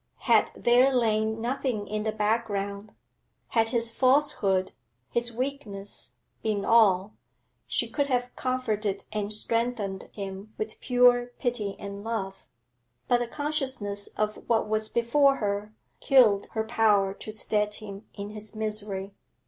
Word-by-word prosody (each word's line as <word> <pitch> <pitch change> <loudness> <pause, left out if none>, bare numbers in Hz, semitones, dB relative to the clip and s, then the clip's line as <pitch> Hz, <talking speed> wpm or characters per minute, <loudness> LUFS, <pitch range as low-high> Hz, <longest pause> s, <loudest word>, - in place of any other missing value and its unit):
Had - - +4
there 250 +3 +4
lain 220 -3 +1
nothing 240 -3 -2
in 215 0 -2
the 220 0 -1
background, 210 -1 -2 0.5
had 225 -2 +2
his 230 -1 +1
falsehood, 240 -8 +2 0.4
his 235 0 +1
weakness, 230 -6 -3 0.3
been 210 -2 -1
all, 210 -3 +4 0.5
she - - 0
could 285 -2 -1
have 250 -2 -1
comforted 215 -6 -2
and 210 -1 -2
strengthened 215 -3 -2
him 200 +1 -7
with 215 0 -5
pure 245 -1 +4
pity 230 -6 -2
and 200 0 -7
love. 205 -4 -4 0.6
But 245 - +3
the 240 - -2
consciousness 265 -8 -2
of 215 0 0
what 225 -2 +2
was 215 0 0
before 275 +4 +3
her 205 -2 -2 0.3
killed 225 -7 +5
her 220 - 0
power 215 -4 +3
to 215 - -8
stead 210 -1 0
him 205 -1 -9
in 205 0 -6
his 215 0 -8
misery. 210 -2 -3
215 Hz, 130 wpm, -27 LUFS, 205-240 Hz, 0.6 s, killed